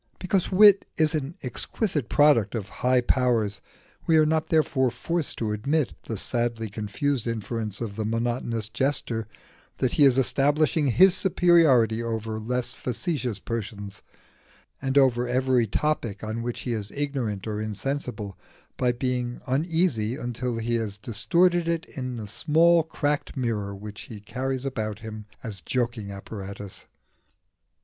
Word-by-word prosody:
Because 185 0 0
wit 200 +1 +7
is 155 -1 +3
an 150 +1 -2
exquisite 145 - -2
product 140 -8 +4
of 105 -4 -3
high 125 0 +4
powers, 120 -5 +1 0.5
we 160 - +5
are 155 - +6
not 160 0 0
therefore 150 -5 +2
forced 160 +6 -2
to 110 -2 -1
admit 140 +7 0
the 110 - -4
sadly 115 0 -1
confused 120 +5 -2
inference 110 -2 -3
of 105 -4 -4
the 110 - -1
monotonous 115 0 -1
jester 120 -2 -1 0.5
that 130 - +1
he 150 - +3
is 135 -2 +6
establishing 145 +3 +2
his 180 +9 +6
superiority 165 -11 +4
over 110 -1 -3
every 110 0 -8
less 125 0 -1
facetious 125 - -2
person, 105 -2 -5 0.9
and 135 0 0
over 125 -3 +4
every 125 -1 +2
topic 115 -4 -1
on 110 +2 -3
which 120 0 -4
he 120 - -2
is 105 -2 -3
ignorant 135 -9 -3
or 105 -1 -3
insensible, 110 -2 -3 0.4
by 125 -1 +2
being 125 -1 -2
uneasy 140 -5 +1
until 120 -2 -3
he 115 +1 0
has 105 -3 -3
distorted 170 - +2
it 170 0 -1
in 130 -4 -5
the 110 - -5
small 165 +9 +4
cracked 145 -3 -2
mirror 105 -5 -2
which 105 +1 -8
he 110 - -8
carries 130 +5 -3
about 110 -6 -2
with 110 - -17
him 110 -1 -7 0.2
as 110 -5 -5
a - - -19
joking 120 -5 -2
apparatus. 100 0 -8
120 Hz, 150 wpm, -26 LUFS, 110-145 Hz, 0.9 s, wit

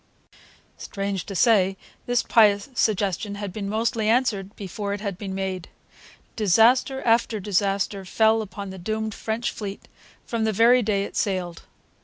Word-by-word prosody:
Strange 195 -2 -4
to 195 - -6
say, 195 -3 +3 0.3
this 245 -1 +1
pious 205 0 +4
suggestion 205 -3 0
had 200 -2 -6
been 200 -1 -4
mostly 220 0 0
answered 220 -5 0
before 200 +1 -5
it 205 - -4
had 200 -2 -4
been 190 0 -6
made. 190 -2 -4 0.7
Disaster 230 +6 +3
after 230 -1 +2
disaster 195 0 -1
fell 220 +4 +2
upon 200 -1 -7
the 190 - -9
doomed 220 +3 -3
French 225 +3 -3
fleet 200 -2 -7 0.4
from 230 -2 -2
the 220 - +1
very 235 +4 +5
day 205 -3 0
it - - -8
sailed. 180 -4 -2
205 Hz, 150 wpm, -24 LUFS, 195-225 Hz, 0.7 s, very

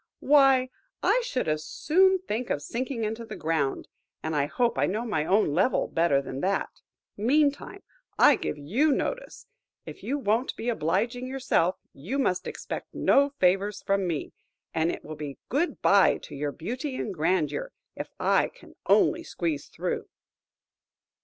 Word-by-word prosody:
Why, 270 -3 +4 0.3
I - - +3
should 260 - -2
as 155 0 0
soon 375 - +3
think 235 +4 -2
of 145 - -1
sinking 245 - -3
into 220 +2 -3
the 225 -2 -8
ground, 155 -4 -1 0.4
and 160 0 -2
I 145 -1 +1
hope 240 +8 0
I - - +3
know 215 +5 -2
my 155 -10 -1
own 195 -5 +2
level 185 - +2
better 155 -5 +2
than 135 0 -6
that! 195 +1 0 0.5
Meantime, 285 - +1 0.3
I - - +7
give - - -4
you 225 - +1
notice. - - -3 0.4
If - - -9
you 280 - -2
won't 230 0 0
be 235 - -3
obliging 230 +6 -1
yourself, 250 -9 +1 0.2
you 185 - -4
must 185 -10 0
expect - - -6
no 280 +1 +4
favour 190 +3 +3
from 195 -2 -1
me, 160 -4 -3 0.4
and 160 +1 +1
it - - -8
will 155 - -6
be 145 -2 -7
good 315 +7 -1
bye - - +5
to - - -10
your 145 +1 -2
beauty 255 - -5
and 215 - -3
grandeur 180 - 0 0.2
if - - -6
I - - +3
can - - -17
only 335 -1 +4
squeeze 165 - -3
through!" - - -4
215 Hz, 160 wpm, -27 LUFS, 160-265 Hz, 0.5 s, I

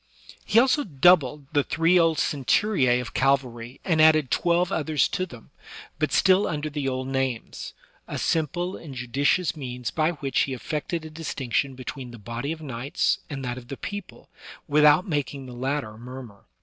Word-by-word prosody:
He 215 - +1
also 260 +4 +5
doubled 150 - +3
the 145 -2 +3
three 165 +5 +3
old 165 -2 +3
centuria 135 - +2
of 120 - -8
cavalry 130 -2 0
and 165 -4 +3
added 155 -4 +5
twelve 175 0 +2
others 155 -2 +1
to 185 -1 -2
them, 120 -8 -14 0.5
but 155 -3 0
still 190 +2 +4
under 150 -1 -3
the 145 -2 -2
old 130 0 -3
names 135 -3 -3
— - - -33
a - - -4
simple 175 +4 -1
and 145 -5 -9
judicious 140 +8 +1
means 125 -4 -5
by 160 +1 +1
which 140 -4 -2
he 135 - +1
effected 155 +4 -4
a 155 - -9
distinction 140 -4 -2
between 130 0 -7
the 120 - -10
body 115 +6 -5
of 160 -1 -6
knights 130 -1 -1
and 135 -3 -5
that 125 0 -3
of 120 - -15
the 135 - -6
people, 205 -1 -7 0.4
without 150 +5 +5
making 145 -4 -2
the 125 - -9
latter 130 -3 -3
murmur. 120 -4 -10
145 Hz, 175 wpm, -25 LUFS, 130-160 Hz, 0.5 s, also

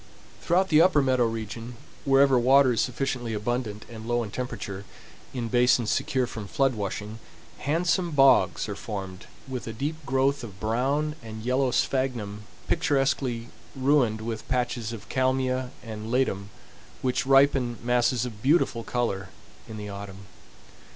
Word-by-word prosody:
Throughout 185 +3 +2
the 155 0 +6
upper 175 -3 +5
meadow 130 -3 +3
region, 115 +2 -5 0.3
wherever 135 -1 +5
water 130 +1 +5
is 115 - +1
sufficiently 125 -3 -2
abundant 105 -1 -3
and 110 -1 -9
low 120 0 +1
in 105 - -7
temperature, 100 -6 -5 0.5
in 120 -3 -3
basins 120 -1 +3
secure 130 -1 +1
from 110 -4 -7
flood 135 +4 +1
washing, 105 +1 -5 0.4
handsome 175 +4 +1
bogs 135 -6 +4
are 105 - -4
formed 95 -2 -6 0.2
with 130 -3 -5
a 115 - -4
deep 150 +7 -4
growth 135 0 +1
of 100 -4 -9
brown 135 +8 0
and 110 -1 -8
yellow 130 +2 +2
sphagnum 120 -6 -1 0.2
picturesquely 135 -7 0 0.3
ruined 130 -5 +2
with 110 -1 -5
patches 120 -3 -1
of 115 -3 -8
kalmia 130 -1 0
and 110 -1 -7
ledum 100 -6 0 0.5
which 130 0 0
ripen 135 -3 +4
masses 120 0 +2
of 110 -4 -8
beautiful 130 -4 +2
color 100 -7 -2 0.4
in 110 - -7
the 105 -1 -6
autumn. 100 -1 -8
125 Hz, 145 wpm, -26 LUFS, 110-135 Hz, 0.5 s, the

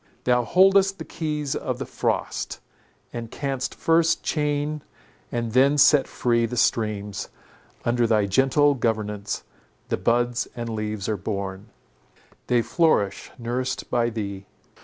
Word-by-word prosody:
Thou 125 -1 +3
holdest 195 +5 +4
the - - -7
keys 150 -3 -3
of - - -3
the - - -4
frost, - - -2 0.5
and 115 -1 -5
canst 135 -1 -3
first 165 0 +2
chain 150 0 -1 0.5
and 120 -1 -2
then 135 +4 +4
set 145 -1 +6
free 120 -1 +1
the 125 - -5
streams; 105 -4 0 0.6
under 120 0 +2
thy 110 -2 +3
gentle 135 +8 +3
governance 105 -4 -2 0.5
the - - 0
buds 120 +1 +1
and 115 -1 -4
leaves 105 -2 -3
are 110 - 0
born, 100 0 -4 0.8
they 120 -1 +3
flourish 135 - +1
nursed 125 +2 -3
by 120 -1 +2
thee. 100 -4 -5
120 Hz, 130 wpm, -24 LUFS, 110-145 Hz, 0.8 s, set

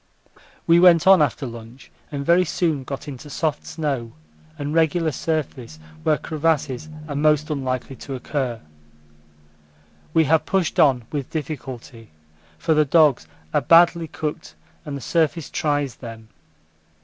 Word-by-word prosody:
We 170 +1 +5
went 175 -3 +6
on 190 -3 +7
after 145 -1 0
lunch, 115 +1 -11 0.2
and 140 -1 -4
very 170 +3 +5
soon 160 -4 -1
got 135 +2 -7
into 145 +1 -8
soft 150 0 -2
snow 135 -8 -3 0.4
and 145 +1 -4
regular 165 0 +2
surface 135 - -3 0.2
where 150 - +2
crevasses 155 -3 -1 0.2
are 145 - -5
most 150 +1 +2
unlikely 130 -2 -3
to 135 - -7
occur. 125 -3 -3 1.5
We 160 - +4
have 160 +1 +3
pushed 190 -4 0
on 130 -5 +4
with 145 -4 -4
difficulty, 130 -6 -7 0.5
for 160 - +1
the 155 0 +4
dogs 145 - +3 0.3
are - - +3
badly 170 0 +5
cooked 150 0 -5 0.3
and 145 -2 -5
the - - -9
surface 165 +1 0
tries 145 -3 -1
them. 115 -2 -10
150 Hz, 135 wpm, -22 LUFS, 130-160 Hz, 1.5 s, on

